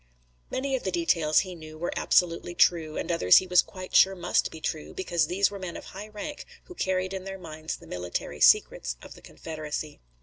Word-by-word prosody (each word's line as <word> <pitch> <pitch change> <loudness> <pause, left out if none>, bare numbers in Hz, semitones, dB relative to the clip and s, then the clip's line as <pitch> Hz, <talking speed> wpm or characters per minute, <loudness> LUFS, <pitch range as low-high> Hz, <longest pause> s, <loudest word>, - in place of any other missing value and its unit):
Many 270 +1 -1
of 255 - -2
the 190 - -2
details, 165 -3 +2
he 185 -2 -7
knew, 155 -2 -11
were 175 +2 -3
absolutely 175 0 +1
true, 160 -4 +3
and - - -2
others 90 - +6
he 185 - +3
was 180 -1 +5
quite 185 -1 -9
sure 195 0 +6
must 175 -1 +1
be 160 - -10
true, 155 -1 -4
because 175 -4 0
these 190 +4 +2
were 200 - -7
men 185 -2 -6
of - - -10
high 200 +3 -8
rank 255 +8 -7 0.2
who 360 - -12
carried 185 - -1
in 190 -1 -4
their 195 0 -6
minds 160 -3 -6
the - - -16
military 90 -1 -5
secrets - - +4
of - - -10
the - - -16
Confederacy. 155 -1 -6
175 Hz, 210 wpm, -27 LUFS, 155-190 Hz, 0.2 s, others